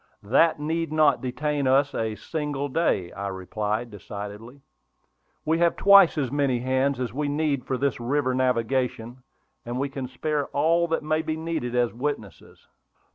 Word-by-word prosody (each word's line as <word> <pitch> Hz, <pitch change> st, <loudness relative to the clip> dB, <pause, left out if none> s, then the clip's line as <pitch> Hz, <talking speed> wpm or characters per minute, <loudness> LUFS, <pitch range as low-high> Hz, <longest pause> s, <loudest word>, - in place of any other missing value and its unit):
"That 145 Hz, +10 st, +3 dB
need 160 Hz, +2 st, -2 dB
not 155 Hz, -2 st, +3 dB
detain 145 Hz, +2 st, -1 dB
us 140 Hz, +2 st, +3 dB
a 110 Hz, -1 st, -2 dB
single 145 Hz, 0 st, -4 dB
day," 130 Hz, -, 0 dB
I 100 Hz, 0 st, -5 dB
replied, 105 Hz, +4 st, -3 dB
decidedly. 105 Hz, +6 st, -9 dB, 0.8 s
"We 160 Hz, +2 st, +1 dB
have 170 Hz, 0 st, +3 dB
twice 200 Hz, -4 st, +6 dB
as 135 Hz, -5 st, -1 dB
many 140 Hz, -3 st, +1 dB
hands 130 Hz, +2 st, 0 dB
as 120 Hz, -4 st, -3 dB
we 145 Hz, +2 st, -1 dB
need 145 Hz, -2 st, -1 dB
for 130 Hz, -, -1 dB
this 140 Hz, -1 st, -1 dB
river 130 Hz, +2 st, 0 dB
navigation; 125 Hz, -1 st, -1 dB, 0.4 s
and 120 Hz, +1 st, -5 dB
we 140 Hz, +1 st, -1 dB
can 135 Hz, -1 st, -5 dB
spare 145 Hz, +3 st, -2 dB
all 165 Hz, +4 st, +2 dB
that 165 Hz, -2 st, -1 dB
may 155 Hz, +1 st, 0 dB
be 160 Hz, 0 st, -3 dB
needed 160 Hz, -7 st, -3 dB
as 120 Hz, -1 st, +1 dB
witnesses." 115 Hz, -, -6 dB
135 Hz, 160 wpm, -25 LUFS, 120-150 Hz, 0.8 s, twice